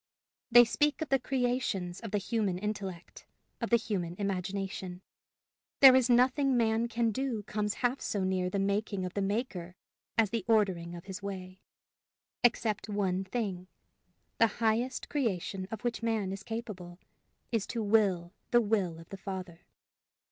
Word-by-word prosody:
They 240 0 +9
speak 295 +8 +1
of 305 - -8
the 270 - +3
creations 245 -9 -1
of 225 - -6
the 205 - 0
human 205 -2 -1
intellect, 195 -3 -5 0.3
of 230 - -1
the 235 - +6
human 185 -7 -3
imagination! 190 -1 -3 0.8
there 265 -2 +10
is 260 -1 +4
nothing 255 +2 +4
man 225 0 +2
can 235 -1 +1
do 240 -2 -2
comes 210 0 -2
half 245 +3 +1
so 200 -2 -1
near 185 -1 0
the 200 - -2
making 200 0 0
of 180 - -5
the 200 - -1
Maker 195 -4 -2 0.4
as 220 -3 +3
the 230 -4 -1
ordering 190 -6 +2
of 170 - -9
his 190 0 -7
way 190 -1 -7 0.8
except 220 -3 +2
one 195 -2 0
thing: 190 -3 -3 0.7
the 230 - +6
highest 235 +3 0
creation 195 - -2
of 225 - -6
which 240 -1 -1
man 220 -4 0
is 195 +1 -5
capable, 195 -6 -6 0.5
is 225 -4 0
to 230 -2 -2
will 200 -5 +2 0.2
the 240 - +5
will 205 -7 0
of 165 0 -12
the 195 - -7
Father. 185 -3 -6
205 Hz, 155 wpm, -31 LUFS, 185-230 Hz, 0.8 s, there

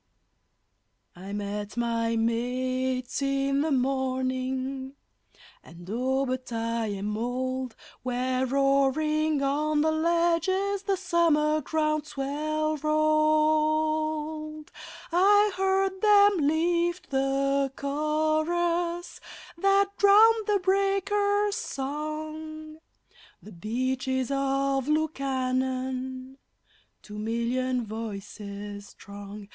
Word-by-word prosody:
I 190 +3 -9
met 205 +1 -4
my 230 -1 0
mates 255 +3 -1
in 275 0 +1
the 315 - 0
morning 260 0 -1 0.7
(and, 170 +2 -13
oh, 260 +4 0
but 255 -1 -4
I 230 0 -1
am 205 +1 -3
old!) 255 +2 -3 0.3
Where 255 +1 -1
roaring 275 +3 +2
on 295 +2 +1
the 315 +1 +2
ledges 340 +4 +1
the 395 -1 -1
summer 325 -4 +2
ground 305 0 -1
swell 310 +3 -2
rolled; 310 +1 +1 0.4
I 410 +4 +5
heard 385 0 0
them 405 -7 +5
lift 340 +2 0
the 275 0 +1
chorus 315 +4 -1 0.4
that 395 +3 +3
drowned 430 +2 +6
the 415 -1 +3
breakers' 400 +2 +1
song 310 +2 -5 0.6
The 215 - -13
Beaches 255 +6 -2
of 275 -1 0
Lukannon 260 -3 -2 0.7
two 210 0 -9
million 240 +3 -1
voices 205 -1 -7
strong. 200 0 -10
275 Hz, 85 wpm, -27 LUFS, 255-315 Hz, 0.7 s, drowned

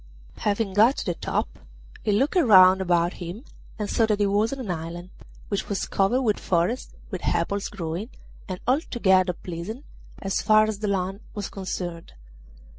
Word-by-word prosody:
Having 205 -1 0
got 225 +7 +5
to - - -3
the 175 - 0
top, - - -3 0.4
he 210 - 0
looked 265 - +1
round 190 - +7
about 175 -1 +2
him 175 +8 -6 0.3
and 210 -2 -3
saw 225 +2 +2
that 210 -1 +1
he 205 - +3
was 205 +3 +2
on 275 - -4
an 240 -8 -4
island, 170 +2 -6 0.4
which 200 - -2
was 200 -2 -1
covered 220 +7 +1
with 215 -4 +1
forest, 180 +8 -1 0.2
with - - -5
apples 200 0 0
growing, 180 +3 -5 0.4
and 185 -1 -4
altogether 195 - +2
pleasant 180 - -7 0.3
as 195 0 -1
far 215 0 +5
as 215 -2 -3
the 210 - -2
land 195 0 -1 0.2
was 205 -2 -4
concerned. 180 -3 -5
200 Hz, 170 wpm, -25 LUFS, 180-215 Hz, 0.4 s, round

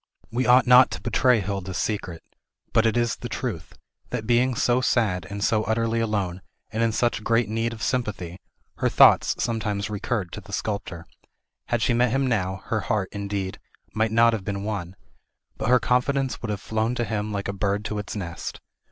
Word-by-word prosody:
We 125 +2 0
ought 125 +1 +6
not 125 +1 +7
to - - -6
betray 120 0 +3
Hilda's 95 -2 -4
secret; 90 -6 -3 0.5
but 115 0 +4
it 115 - +1
is 120 -1 +1
the - - -7
truth, - - -5 0.3
that 115 -3 -3
being 120 +2 +2
so 125 +2 +2
sad, 105 -8 +1
and 100 0 -4
so 110 0 +2
utterly 115 +1 0
alone, 100 -5 -1 0.3
and 110 +1 -2
in 115 -1 +2
such 115 -1 0
great 115 -1 +2
need 115 +1 -1
of 115 -1 -7
sympathy, 100 -8 -2 0.4
her - - +1
thoughts - - +6
sometimes 105 -3 -2
recurred 100 -3 -2
to - - -7
the - - -12
sculptor. 95 -5 -4 0.6
Had 120 -2 0
she 115 - +2
met 120 +1 +3
him 135 +3 +1
now, 95 -6 -1
her 110 - -1
heart, 105 -3 -1
indeed, 100 -2 -4 0.3
might 110 0 +1
not 115 +1 +5
have 110 -4 -3
been 100 +1 -3
won, 100 -4 -4 0.6
but - - -2
her 125 0 +6
confidence 130 +3 0
would 110 - -4
have 105 -2 -3
flown 110 +2 -1
to 120 - -1
him 105 -2 -2
like 100 -1 -3
a 100 - -2
bird 100 +1 -1
to 105 -1 -3
its 105 - -6
nest. 85 -5 -5
110 Hz, 195 wpm, -25 LUFS, 100-120 Hz, 0.6 s, not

